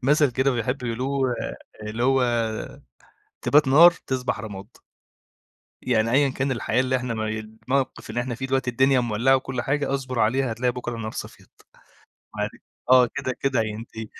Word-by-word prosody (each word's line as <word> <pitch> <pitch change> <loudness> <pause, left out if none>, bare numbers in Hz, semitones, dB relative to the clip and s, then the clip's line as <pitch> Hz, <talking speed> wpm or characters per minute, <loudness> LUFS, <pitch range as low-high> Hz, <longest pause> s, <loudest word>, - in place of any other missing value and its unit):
مَثَل 145 +1 +4
كده 130 +2 +1
بيحبوا 125 +1 -2
يقولوه 130 +2 -1 0.5
اللي 110 +3 -3
هو: 135 0 +3 1.2
"تبات 145 -2 +4
نار، 165 +6 +8 0.2
تصبح 125 -4 -2
رماد." 100 -2 -8 1.2
يعني 115 -2 +1
أيًا 140 +1 +4
كان 135 +1 -2
الحياة 125 -1 0
اللي 130 0 +1
إحنا 125 -2 -2
مي 110 0 -2
الموقف 110 +5 -3
اللي 120 - -1
إحنا 120 -2 -4
فيه 130 - -4
دلوقتي، 130 -1 0
الدنيا 130 +2 +3
مولّعة 120 +3 +2
وكل 130 -2 -3
حاجة 140 +1 -1
اصبر 130 -3 -4
عليها، 125 +3 +2
هتلاقي 125 +2 0
بكرة 120 -1 -5
النار 110 -1 -5
صفيت، - - -9 0.9
عار - - -1 0.4
آه، 125 -1 +7
كده، 130 -2 -2
كده 130 -4 +1
هينتهي. 110 +1 -6
125 Hz, 155 wpm, -24 LUFS, 115-135 Hz, 1.2 s, نار